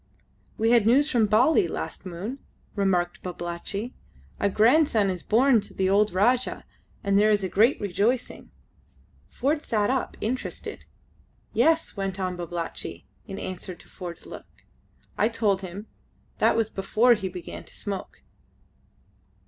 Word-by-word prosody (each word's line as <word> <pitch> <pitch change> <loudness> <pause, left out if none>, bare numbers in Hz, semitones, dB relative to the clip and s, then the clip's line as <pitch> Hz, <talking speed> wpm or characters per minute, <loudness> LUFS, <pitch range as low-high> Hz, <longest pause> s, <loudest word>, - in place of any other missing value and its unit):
"We 225 +1 +2
had 235 -3 +5
news 285 +6 +4
from 230 -4 +3
Bali 260 - +4
last - - -5
moon," 195 +10 -5 0.4
remarked 185 -4 0
Babalatchi. 180 +6 -5 0.5
"A 200 - +2
grandson 225 -1 +4
is 180 -2 -5
born 235 +1 +4
to - - -10
the 190 0 +1
old 205 +1 +3
Rajah, 240 +7 +1 0.4
and 200 0 +3
there 210 +1 +4
is 205 -2 +2
great 230 +7 +4
rejoicing." 210 +5 -1 0.8
Ford 295 +4 -1
sat 215 -5 0
up 265 -1 -2
interested. 245 +4 -4 0.7
"Yes," 320 +8 +2
went 195 -1 -3
on 185 -1 -2
Babalatchi, 175 -1 -5 0.2
in 195 -2 -6
answer 185 -1 -5
to - - -18
Ford's 175 -2 -8
look. - - -12 0.5
"I 215 - +4
told 210 -4 +1
him. 190 +3 -7 0.5
That - - +4
was 225 -1 0
before 220 +5 +3
he 195 -4 -2
began 180 -2 -8
to - - -15
smoke." 200 -2 -6
205 Hz, 140 wpm, -26 LUFS, 190-235 Hz, 0.8 s, had